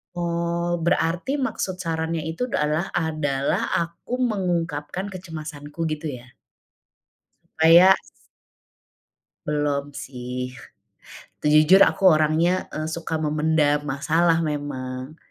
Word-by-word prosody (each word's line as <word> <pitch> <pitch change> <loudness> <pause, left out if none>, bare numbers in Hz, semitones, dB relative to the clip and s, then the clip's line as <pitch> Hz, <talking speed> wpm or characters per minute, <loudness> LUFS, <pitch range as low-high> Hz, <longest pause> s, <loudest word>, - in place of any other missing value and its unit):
Oh, 170 0 -1
berarti 170 - 0
maksud 190 -8 -3
sarannya 165 -1 -2
itu 165 +10 -2
dalah 155 -7 0
adalah 155 -5 0 0.2
aku 170 +10 -5
mengungkapkan 180 -5 -2
kecemasanku 160 -3 -6
gitu 155 +1 -4 0.2
ya? 130 +1 -20 1.3
Supaya 170 +4 +8 1.5
Belum 145 -1 -1
sih. 125 -2 -6 0.9
Tuh 150 - 0
jujur 155 +6 +7
aku - - -6
orangnya, 155 +2 +2 0.2
eee, 155 - -3
suka 165 -1 -4
memendam 150 -1 +2
masalah 165 +4 +2
memang. 135 -1 -5
160 Hz, 95 wpm, -23 LUFS, 145-170 Hz, 1.5 s, Supaya